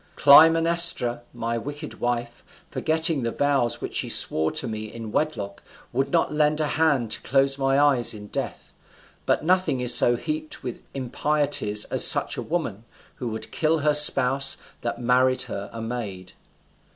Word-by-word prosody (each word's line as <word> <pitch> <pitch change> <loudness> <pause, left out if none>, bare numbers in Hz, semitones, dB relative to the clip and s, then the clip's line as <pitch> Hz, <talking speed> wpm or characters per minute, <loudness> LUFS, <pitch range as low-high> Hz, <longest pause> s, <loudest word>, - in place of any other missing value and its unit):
"Clytemnestra, 165 -4 +4
my 115 0 -4
wicked 145 +4 -9
wife, 120 0 -4 0.3
forgetting 160 -2 0
the 115 - -2
vows 120 -3 -1
which - - -6
she - - -2
swore 80 0 +3
to 130 - -2
me 110 -1 -7
in 115 -2 -9
wedlock, 105 -11 -4 0.3
would 135 +3 -1
not 165 -3 0
lend 150 0 +1
a 155 - 0
hand 145 -8 0
to - - 0
close 135 +1 0
my 135 0 +1
eyes 140 -5 +3
in 105 -2 -8
death. - - -7 0.5
But - - 0
nothing 185 -6 +1
is 125 -1 +2
so 120 - +4
heaped 155 +4 -6
with 125 -2 -7
impieties 135 -5 0
as - - +2
such - - +4
a - - -5
woman, 135 - -4 0.3
who 125 - -6
would 110 -1 -7
kill 160 0 -1
her 150 - +3
spouse 135 -2 +5 0.2
that 120 - -5
married 130 +1 +1
her 100 0 -7
a 115 -1 -8
maid. 105 -6 -7
130 Hz, 165 wpm, -23 LUFS, 115-150 Hz, 0.5 s, spouse